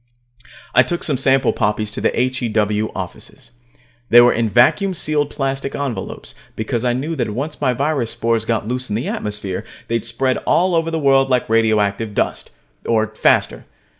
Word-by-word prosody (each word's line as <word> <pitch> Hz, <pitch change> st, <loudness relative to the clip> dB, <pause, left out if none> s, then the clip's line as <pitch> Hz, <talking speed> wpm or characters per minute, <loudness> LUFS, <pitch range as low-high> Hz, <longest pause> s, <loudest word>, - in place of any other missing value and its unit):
I 125 Hz, -, +7 dB
took 170 Hz, +7 st, -2 dB
some 140 Hz, -5 st, 0 dB
sample 135 Hz, 0 st, +3 dB
poppies 105 Hz, 0 st, -1 dB
to -, -, -5 dB
the -, -, 0 dB
H.E.W. 110 Hz, -4 st, 0 dB
offices. -, -, -8 dB, 0.6 s
They 120 Hz, -, +8 dB
were 120 Hz, 0 st, +6 dB
in 115 Hz, -1 st, 0 dB
vacuum 180 Hz, -, +3 dB
sealed 150 Hz, -2 st, 0 dB
plastic 135 Hz, -1 st, -3 dB
envelopes, 140 Hz, -4 st, -5 dB, 0.2 s
because 115 Hz, +2 st, -2 dB
I 125 Hz, -1 st, +1 dB
knew 145 Hz, +7 st, -3 dB
that 120 Hz, -6 st, -2 dB
once 150 Hz, +5 st, -4 dB
my 130 Hz, -3 st, +2 dB
virus 140 Hz, -2 st, -1 dB
spores 115 Hz, -1 st, -1 dB
got 110 Hz, -2 st, -1 dB
loose 125 Hz, +2 st, -3 dB
in 105 Hz, -, -2 dB
the 115 Hz, -, -2 dB
atmosphere, 105 Hz, -3 st, -4 dB, 0.3 s
they'd 115 Hz, -2 st, -1 dB
spread 120 Hz, +3 st, 0 dB
all 185 Hz, +1 st, +1 dB
over 165 Hz, 0 st, +1 dB
the 165 Hz, -, -2 dB
world 135 Hz, -3 st, +3 dB
like 125 Hz, -2 st, +1 dB
radioactive 110 Hz, -1 st, +1 dB
dust, -, -, -1 dB, 0.3 s
or 110 Hz, -2 st, +1 dB
faster. -, -, +1 dB
120 Hz, 170 wpm, -19 LUFS, 110-135 Hz, 0.6 s, They